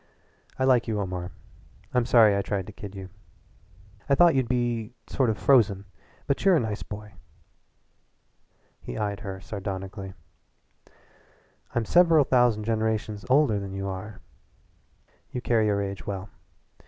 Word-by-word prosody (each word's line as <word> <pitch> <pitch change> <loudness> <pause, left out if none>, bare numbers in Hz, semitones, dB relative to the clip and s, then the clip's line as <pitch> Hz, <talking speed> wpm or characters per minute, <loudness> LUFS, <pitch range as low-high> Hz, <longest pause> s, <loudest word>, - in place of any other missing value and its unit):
"I 130 - 0
like 125 -3 +3
you, 110 -2 -1
Omar. 90 -2 -4 0.6
I'm 125 -1 +2
sorry 110 -5 +6
I 100 - +1
tried 100 -1 -3
to 105 - -10
kid 100 -1 -9
you. 95 -1 -8 1.0
I 140 - +5
thought 175 +2 +6
you'd 130 -3 +1
be 120 -2 -1
sort 130 -4 +1
of 110 - -1
frozen, 105 -7 +3 0.4
but 140 - -1
you're 195 -2 +5
a - - +4
nice 110 -4 -3
boy." 105 0 -8 1.7
He - - -7
eyed 105 -1 -2
her 95 -3 -6
sardonically. 95 0 -6 1.6
"I'm 120 -2 +1
several 165 -1 +5
thousand 120 -4 +2
generations 110 -2 -1
older 130 -6 +4
than 100 -1 -6
you 95 0 -3
are." 95 +2 -7 1.1
"You 125 - -4
carry 115 -3 +2
your 100 -1 +1
age 100 -2 -6
well." 95 -1 -5
105 Hz, 140 wpm, -26 LUFS, 100-120 Hz, 1.7 s, sorry